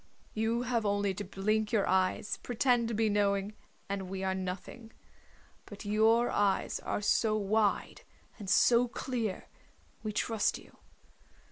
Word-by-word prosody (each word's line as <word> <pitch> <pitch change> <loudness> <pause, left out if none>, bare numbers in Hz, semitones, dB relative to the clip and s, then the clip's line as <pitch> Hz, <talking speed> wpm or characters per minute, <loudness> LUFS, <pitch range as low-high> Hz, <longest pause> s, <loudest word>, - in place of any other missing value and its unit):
You 225 +2 0
have 235 -2 0
only 205 -1 0
to 205 +2 -5
blink 210 +3 -1
your 215 -4 +2
eyes, 185 +2 +1
pretend 245 -1 +1
to 230 - -2
be 220 +1 +2
knowing, 200 0 +1 0.3
and 195 -2 -4
we 190 0 -4
are 190 0 0
nothing. 190 +5 -6 0.8
But 205 0 -10
your 220 +3 +3
eyes 200 -2 +1
are - - -3
so 215 +1 +2
wide 210 0 0 0.4
and 200 -3 -6
so 240 +5 +5
clear, 235 -5 -4 0.5
we 215 - -3
trust 215 +1 0
you. - - -17
210 Hz, 140 wpm, -31 LUFS, 195-225 Hz, 0.8 s, so